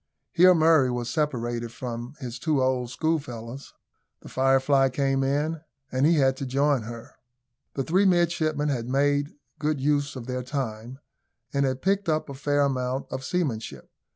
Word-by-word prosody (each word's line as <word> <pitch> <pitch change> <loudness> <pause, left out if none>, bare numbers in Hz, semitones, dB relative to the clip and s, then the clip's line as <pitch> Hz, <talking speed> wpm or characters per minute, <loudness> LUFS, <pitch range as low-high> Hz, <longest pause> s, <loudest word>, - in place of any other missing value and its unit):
Here 180 +1 +6
Murray 160 -5 +4
was 120 -1 -3
separated 120 -6 -2
from 120 +2 -6
his 125 -3 -6
two 150 +1 +1
old 130 -2 0
schoolfellows. 130 -4 -3 0.5
The - - -11
Firefly 135 +1 +3
came 135 +1 0
in, 150 +4 0 0.3
and 130 +3 +2
he 170 - +4
had 135 -3 +3
to 135 - -4
join 140 0 +2
her. 115 +1 -9 0.6
The 135 - -1
three 185 +8 +2
midshipmen 165 -5 +2
had 120 -3 -2
made 145 +2 +1 0.2
good 150 -1 0
use 145 0 0
of 125 -3 -7
their 125 0 -3
time, 125 -2 -5 0.6
and 140 -1 +2
had 130 0 -3
picked 195 0 +1
up 155 -1 0
a - - -5
fair 145 +1 0
amount 130 -1 -1
of 130 - -4
seamanship. 135 -9 -3
135 Hz, 160 wpm, -26 LUFS, 125-150 Hz, 0.6 s, Here